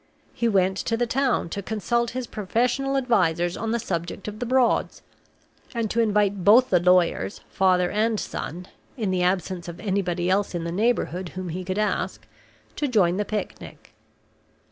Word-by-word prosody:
He 235 Hz, -, 0 dB
went 190 Hz, -3 st, +2 dB
to 230 Hz, -, -1 dB
the 240 Hz, -, +1 dB
town 255 Hz, -6 st, 0 dB
to 200 Hz, -, -4 dB
consult 230 Hz, +4 st, -1 dB
his 255 Hz, +1 st, -4 dB
professional 245 Hz, +7 st, 0 dB
advisers 180 Hz, -9 st, +1 dB
on 225 Hz, -, -3 dB
the 235 Hz, -, +1 dB
subject 175 Hz, -3 st, -4 dB
of 210 Hz, 0 st, -6 dB
the 245 Hz, -, -3 dB
Broads, 255 Hz, 0 st, +1 dB, 0.7 s
and 230 Hz, -2 st, -1 dB
to 235 Hz, -, 0 dB
invite 205 Hz, -3 st, +1 dB
both 235 Hz, +6 st, +6 dB
the 180 Hz, -, +5 dB
lawyers, 180 Hz, +2 st, +2 dB
father 185 Hz, -2 st, +2 dB
and 215 Hz, +1 st, +1 dB
son 180 Hz, +4 st, -5 dB, 0.3 s
(in 215 Hz, -5 st, -1 dB
the 185 Hz, -1 st, 0 dB
absence 180 Hz, -1 st, -1 dB
of 170 Hz, +1 st, -8 dB
anybody 185 Hz, -4 st, -1 dB
else 195 Hz, 0 st, +1 dB
in 170 Hz, -, -2 dB
the 170 Hz, -, -3 dB
neighborhood 190 Hz, -3 st, 0 dB
whom 185 Hz, -1 st, -4 dB
he 180 Hz, +3 st, -4 dB
could 185 Hz, +2 st, -3 dB
ask), 215 Hz, 0 st, -1 dB, 0.5 s
to 295 Hz, -, 0 dB
join 190 Hz, -8 st, +2 dB
the 210 Hz, -, -1 dB
picnic. 210 Hz, +1 st, -6 dB
200 Hz, 170 wpm, -24 LUFS, 180-230 Hz, 0.7 s, both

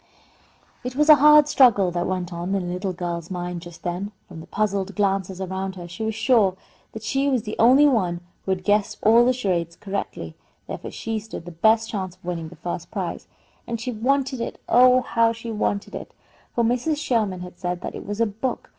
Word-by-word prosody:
It 250 Hz, +1 st, -5 dB
was 300 Hz, +2 st, +2 dB
a 305 Hz, -, +10 dB
hard 300 Hz, +1 st, +7 dB
struggle 225 Hz, -10 st, +5 dB
that 175 Hz, 0 st, -1 dB
went 180 Hz, -2 st, -3 dB
on 175 Hz, +3 st, -2 dB
in 190 Hz, -2 st, -1 dB
the 175 Hz, -, -3 dB
little 185 Hz, +1 st, -2 dB
girl's 175 Hz, -2 st, -4 dB
mind 175 Hz, -1 st, -4 dB
just 175 Hz, -1 st, -12 dB
then. 180 Hz, +3 st, -3 dB, 0.2 s
From 170 Hz, -3 st, -10 dB
the 160 Hz, -, -11 dB
puzzled 200 Hz, -2 st, -1 dB
glances 195 Hz, -2 st, 0 dB
around 190 Hz, 0 st, -4 dB
her 175 Hz, -2 st, -8 dB
she 175 Hz, +6 st, -6 dB
was 220 Hz, -1 st, -2 dB
sure 220 Hz, -6 st, +3 dB, 0.4 s
that 220 Hz, -, -8 dB
she 270 Hz, +5 st, 0 dB
was 255 Hz, -5 st, +1 dB
the 210 Hz, -, -5 dB
only 260 Hz, +6 st, +7 dB
one 180 Hz, -10 st, +1 dB, 0.2 s
who -, -, -7 dB
had 185 Hz, -1 st, -1 dB
guessed 210 Hz, +1 st, +1 dB
all 230 Hz, +2 st, +6 dB
the 250 Hz, -, +4 dB
charades 180 Hz, -9 st, -1 dB
correctly; 200 Hz, +1 st, -5 dB, 0.3 s
therefore -, -, -6 dB
she 225 Hz, -1 st, -3 dB
stood 210 Hz, -5 st, -9 dB
the 175 Hz, -, -8 dB
best 220 Hz, +7 st, +3 dB
chance 185 Hz, -4 st, -4 dB
of 185 Hz, -, -23 dB
winning 170 Hz, -3 st, -4 dB
the 175 Hz, -, -13 dB
first 175 Hz, +2 st, -5 dB
prize, -, -, -4 dB, 0.4 s
and 230 Hz, -1 st, -3 dB
she 250 Hz, +2 st, -3 dB
wanted 260 Hz, +2 st, 0 dB
it -, -, -5 dB
oh, 255 Hz, +1 st, +6 dB
how 230 Hz, -1 st, +2 dB
she 230 Hz, 0 st, -7 dB
wanted 205 Hz, -2 st, -2 dB
it! -, -, -8 dB, 0.4 s
for 235 Hz, -, +2 dB
Mrs. 250 Hz, +7 st, +1 dB
Sherman 220 Hz, -10 st, 0 dB
had 180 Hz, 0 st, -10 dB
said 180 Hz, 0 st, -3 dB
that -, -, -5 dB
it -, -, -7 dB
was 205 Hz, +1 st, -4 dB
a 230 Hz, -, +4 dB
book. 220 Hz, +5 st, -4 dB
205 Hz, 215 wpm, -23 LUFS, 180-235 Hz, 0.4 s, a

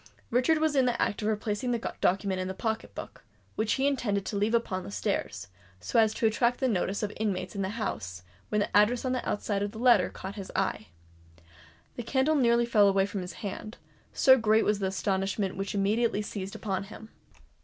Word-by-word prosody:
Richard 255 Hz, +7 st, +3 dB
was 310 Hz, -1 st, +1 dB
in 265 Hz, -2 st, +4 dB
the 240 Hz, -1 st, 0 dB
act 205 Hz, -, 0 dB
of 210 Hz, -, -1 dB
replacing 215 Hz, +3 st, -1 dB
the 235 Hz, -2 st, -2 dB
document 190 Hz, 0 st, +1 dB
in 185 Hz, -, -3 dB
the 190 Hz, -, -4 dB
pocket 220 Hz, +1 st, -3 dB
book, -, -, -9 dB, 0.3 s
which 220 Hz, 0 st, +1 dB
he 270 Hz, -, 0 dB
intended 225 Hz, -8 st, 0 dB
to -, -, -4 dB
leave 210 Hz, +3 st, +1 dB
upon 195 Hz, -5 st, -1 dB
the -, -, -8 dB
stairs, 200 Hz, -, -3 dB, 0.3 s
so 90 Hz, -, +1 dB
as 220 Hz, -1 st, +4 dB
to -, -, 0 dB
attract 235 Hz, +2 st, +2 dB
the 265 Hz, -, +1 dB
notice 200 Hz, -2 st, -1 dB
of 210 Hz, -, 0 dB
the 210 Hz, -, -12 dB
inmates 190 Hz, -4 st, -2 dB
of 200 Hz, -, -3 dB
the 190 Hz, -, -1 dB
house, 100 Hz, -, -4 dB, 0.3 s
when 210 Hz, -, +1 dB
the -, -, -2 dB
address 225 Hz, +5 st, +4 dB
on 255 Hz, -, 0 dB
the 255 Hz, -1 st, -2 dB
outside 205 Hz, -1 st, -1 dB
of 205 Hz, +1 st, -2 dB
the -, -, -9 dB
letter 235 Hz, -5 st, +4 dB
caught 190 Hz, +1 st, -7 dB
his 195 Hz, -2 st, -7 dB
eyes. -, -, -1 dB, 1.1 s
The -, -, -2 dB
candle 265 Hz, +5 st, +1 dB
nearly 235 Hz, -4 st, +3 dB
fell 210 Hz, -4 st, +4 dB
from 200 Hz, -1 st, -4 dB
his 180 Hz, -, -7 dB
hand, 215 Hz, +3 st, -6 dB, 0.3 s
so 260 Hz, -1 st, +5 dB
great 220 Hz, 0 st, +3 dB
was 210 Hz, -1 st, +1 dB
the 195 Hz, -, 0 dB
astonishment 195 Hz, 0 st, -1 dB
which 195 Hz, +1 st, -4 dB
immediately 210 Hz, +2 st, +1 dB
seized 200 Hz, -2 st, -6 dB
upon 195 Hz, -2 st, -3 dB
him. 220 Hz, +2 st, -11 dB
210 Hz, 210 wpm, -28 LUFS, 195-235 Hz, 1.1 s, so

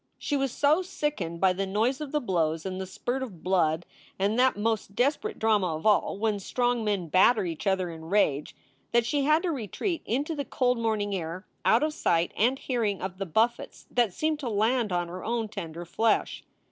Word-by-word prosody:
She 290 Hz, -, -2 dB
was 270 Hz, -2 st, 0 dB
so 295 Hz, +7 st, +3 dB
sickened 285 Hz, -, -3 dB
by 190 Hz, 0 st, +4 dB
the 195 Hz, +1 st, -2 dB
noise 225 Hz, +8 st, 0 dB
of 295 Hz, -3 st, -5 dB
the 300 Hz, -, +1 dB
blows, 165 Hz, -, 0 dB
and 190 Hz, 0 st, -3 dB
the 190 Hz, -, -5 dB
spurt 245 Hz, +7 st, -3 dB
of 195 Hz, -11 st, -7 dB
blood, 175 Hz, -3 st, +1 dB, 0.3 s
and 205 Hz, +5 st, +1 dB
that 260 Hz, -4 st, +4 dB
most 210 Hz, -2 st, -1 dB
desperate 290 Hz, -, 0 dB
drama 205 Hz, -7 st, +2 dB
of 155 Hz, -, -8 dB
all: 210 Hz, -2 st, +3 dB
when 210 Hz, -1 st, 0 dB
strong 245 Hz, +3 st, 0 dB
men 200 Hz, -5 st, -1 dB
batter 195 Hz, +5 st, +4 dB
each 165 Hz, +3 st, -4 dB
other 190 Hz, -2 st, +1 dB
in 160 Hz, -1 st, -9 dB
rage, 160 Hz, -6 st, +1 dB, 0.4 s
that 235 Hz, -1 st, +4 dB
she 280 Hz, +2 st, 0 dB
had 310 Hz, +3 st, +4 dB
to 355 Hz, -, 0 dB
re 245 Hz, -9 st, -4 dB
treat 335 Hz, -, -2 dB
into 280 Hz, +8 st, -1 dB
the 290 Hz, -2 st, -3 dB
cold 250 Hz, -3 st, 0 dB
morning 215 Hz, -3 st, 0 dB
air 180 Hz, +1 st, -4 dB, 0.2 s
out 230 Hz, +6 st, +4 dB
of 305 Hz, 0 st, 0 dB
sight 170 Hz, -, +1 dB
and 245 Hz, +6 st, +2 dB
hearing 230 Hz, -7 st, -1 dB
of 185 Hz, 0 st, -5 dB
the 195 Hz, -, -3 dB
buffets 225 Hz, +8 st, 0 dB
that 240 Hz, -5 st, +2 dB
seemed 310 Hz, -, -1 dB
to 265 Hz, -5 st, -3 dB
land 220 Hz, +1 st, +1 dB
on 175 Hz, -1 st, 0 dB
her 180 Hz, +1 st, -7 dB
own 230 Hz, 0 st, -1 dB
tender 175 Hz, -5 st, -7 dB
flesh. 220 Hz, +6 st, 0 dB
215 Hz, 210 wpm, -27 LUFS, 185-250 Hz, 0.4 s, by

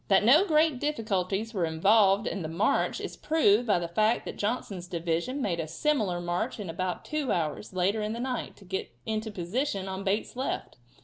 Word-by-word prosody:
That 195 Hz, 0 st, +4 dB
no 300 Hz, -, +6 dB
great 310 Hz, -4 st, +3 dB
difficulties 220 Hz, -6 st, -1 dB
were 185 Hz, -5 st, +1 dB
involved 195 Hz, +5 st, +4 dB
in 195 Hz, -, -2 dB
the 160 Hz, -, -3 dB
march 165 Hz, +6 st, +1 dB
is -, -, -5 dB
proved 245 Hz, -7 st, +3 dB
by 205 Hz, -, +4 dB
the 175 Hz, -1 st, -2 dB
fact 215 Hz, +7 st, +1 dB
that -, -, -5 dB
Johnson's 205 Hz, -5 st, -3 dB
division 170 Hz, -, -2 dB
made 170 Hz, -4 st, -1 dB
a 160 Hz, -, -2 dB
similar 200 Hz, -, 0 dB
march 175 Hz, +8 st, -2 dB
in 190 Hz, -5 st, -4 dB
about 185 Hz, +1 st, -3 dB
two 305 Hz, -4 st, -1 dB
hours, 160 Hz, +3 st, -2 dB
later 190 Hz, +4 st, +1 dB
in 210 Hz, +1 st, -2 dB
the 230 Hz, -, -5 dB
night, 250 Hz, -1 st, -3 dB
to 200 Hz, -, -17 dB
get 190 Hz, +1 st, -3 dB, 0.2 s
into 220 Hz, 0 st, -2 dB
position 195 Hz, +2 st, -2 dB
on 190 Hz, +1 st, -4 dB
Bate's 200 Hz, +4 st, -1 dB
left. 260 Hz, -, -3 dB
205 Hz, 195 wpm, -28 LUFS, 180-240 Hz, 0.2 s, no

